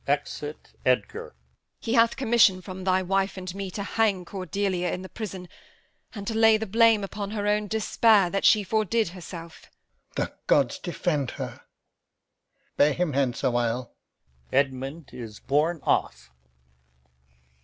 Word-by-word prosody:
[Exit 145 +1 -3
Edgar.] 125 0 0
Edm. - - -31 0.5
He 225 - -3
hath 230 -1 +4
commission 225 -7 +4
from 185 0 -8
thy 185 0 +2
wife 195 +1 0
and 185 -1 -6
me 195 0 -5
To 200 +2 -5
hang 200 -3 +1
Cordelia 185 0 -2
in 180 - -4
the 185 - -9
prison 190 -5 -6 0.7
and 200 -1 -6
To 225 - -2
lay 225 0 +5
the 220 - -3
blame 225 0 +4
upon 200 0 -5
her 205 -1 -3
own 210 0 +1
despair 215 -3 +3
That 195 - -1
she 215 -2 +5
fordid 220 0 +1
herself. 170 -2 -10
Alb. - - -37
The - - -27
gods 390 -12 +3
defend 170 - -1
her! - - -6 1.2
Bear 145 +1 +5
him 175 -3 -1
hence 130 -2 0
awhile. 120 -1 0 0.6
[Edmund 135 +3 -1
is 110 -3 -8
borne 155 +5 +1
off. - - 0
185 Hz, 145 wpm, -26 LUFS, 155-215 Hz, 1.2 s, lay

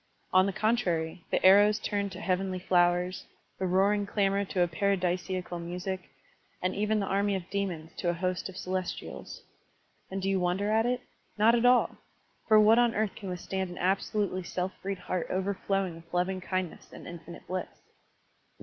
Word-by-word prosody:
On 185 +1 +6
the - - 0
contrary, 185 -6 0
the - - +1
arrows 205 +2 +7
turned 200 -1 -2
to 185 - -8
heavenly 190 -1 -1
flowers, 180 0 +1 0.3
the 190 - 0
roaring 200 +3 +2
clamor 200 -1 +1
to 185 -1 -1
a - - +2
paradisiacal 180 0 -1
music, 180 +2 -5 0.5
and 185 +1 -1
even 210 +1 +1
the 200 - 0
army 200 +1 +1
of 185 -2 -5
demons 180 -5 -3
to 175 - 0
a 175 - 0
host 185 +2 -2
of 190 - -10
celestials. 185 0 -5 0.7
And 195 - -3
do 190 - -2
you 195 -1 +2
wonder 185 +4 0
at 225 +2 +3
it? 250 0 0 0.4
Not 220 +2 +5
at 240 +1 +4
all! 250 0 +4 0.5
For 215 -1 +7
what 220 +2 +6
on 240 -1 +3
earth 215 -1 0
can 195 - -7
withstand 190 +1 -3
an 175 - -8
absolutely 195 +1 0
self 180 +1 -3
freed 195 0 -3
heart 180 -1 -3
overflowing 195 -1 -1
with 165 0 -16
loving 185 +1 0
kindness 185 -1 -4
and - - -11
infinite 170 0 -10
bliss? 185 0 -3
190 Hz, 175 wpm, -29 LUFS, 180-200 Hz, 0.7 s, arrows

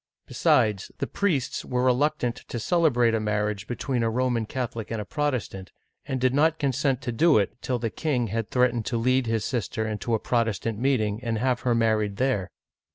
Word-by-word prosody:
Besides, 105 -2 +2
the - - -2
priests 165 -11 -1
were 125 0 -1
reluctant 130 -1 +1
to - - -5
celebrate 125 -4 +2
a 110 - +2
marriage 105 0 -1
between 125 0 -2
a 115 - +1
Roman 120 -1 0
Catholic 120 -3 -4
and 115 - -3
a 105 - -4
Protestant, 125 -10 -3 0.4
and 130 - -2
did 130 0 +2
not 160 +3 +3
consent 135 -2 0
to 120 - -2
do 155 +6 +4
it 100 -3 +1
till 125 - -1
the 115 -2 -3
king 135 -4 -1
had 110 +1 -2
threatened 125 -3 +1
to 120 - 0
lead 130 +2 +2
his 110 -2 0
sister 110 -2 -2
into 110 +2 -1
a - - -1
Protestant 115 -2 -1
meeting, 115 -4 0
and 115 -2 -1
have 125 +2 +1
her 120 -2 +1
married 110 -3 +1
there. 125 -8 0
120 Hz, 190 wpm, -26 LUFS, 110-130 Hz, 0.4 s, do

